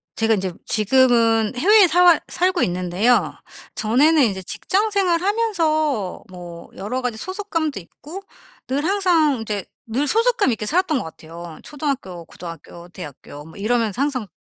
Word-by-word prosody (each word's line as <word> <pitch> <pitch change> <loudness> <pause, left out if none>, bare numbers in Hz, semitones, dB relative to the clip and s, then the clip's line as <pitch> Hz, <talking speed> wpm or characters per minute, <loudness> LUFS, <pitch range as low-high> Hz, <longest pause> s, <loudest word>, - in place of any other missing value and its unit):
제가 225 0 +2
인제 190 -3 -3
지금은 225 -1 +3
해외에 405 - +6
사왈 350 0 +5
살고 365 0 0
있는데요. 180 +7 +1 0.4
전에는 290 +8 +3
인제 195 -5 -1
직장 410 - -1
생활 365 -4 +1
하면서 315 - 0
뭐 175 -2 -11
여러가지 245 +3 -3
소속감도 330 - -3
있고 300 - -11 0.5
늘 275 +3 -1
항상 335 - +2
이제 210 -3 -4 0.2
늘 260 +6 -1
소속감 460 - +2
있게 220 -2 -3
살았던 335 - +1
것 - - -5
같아요. 165 +1 -10
초등학교, 265 - -5
고등학교, 170 0 -11
대학교 145 -4 -10
뭐 160 - -14
이러면서 225 +2 -1
항상 260 -7 -1
250 Hz, 320 characters per minute, -21 LUFS, -, 0.5 s, 해외에